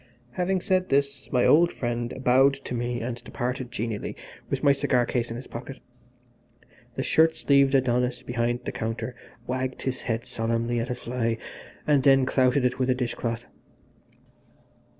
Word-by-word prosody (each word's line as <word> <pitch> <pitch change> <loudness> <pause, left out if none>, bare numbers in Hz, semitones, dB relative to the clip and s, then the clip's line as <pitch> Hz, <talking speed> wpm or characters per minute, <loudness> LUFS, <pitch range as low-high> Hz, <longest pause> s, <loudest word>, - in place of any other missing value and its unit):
Having 185 +4 0
said 185 0 +1
this 140 0 0
my 125 -2 +3
old 170 +3 +5
friend 120 -1 -3
bowed 135 +2 +5
to - - -4
me 120 0 -2
and 120 0 -5
departed 125 0 -4
genially 115 -3 -3 0.3
with - - -2
my 140 - +6
cigar 125 -3 +2
case 120 0 -1
in 115 - -5
his 125 +2 -7
pocket. 130 +3 -8 1.2
The - - -2
shirt 160 0 +4
sleeved 140 -2 +3
Adonis 125 -1 +1
behind 120 0 -1
the - - -2
counter 115 +2 -4 0.3
wagged 130 +1 -3
his 130 -1 -2
head 115 -1 -2
solemnly 115 +1 -1
at 115 +3 -3
a 125 - -1
fly 120 -2 -2 0.5
and 145 -2 +4
then 135 -1 +5
clouted 130 0 +2
it 125 - 0
with 130 0 +1
a 130 - +3
dish 125 -2 -2
cloth. 115 0 -3
125 Hz, 165 wpm, -26 LUFS, 120-135 Hz, 1.2 s, my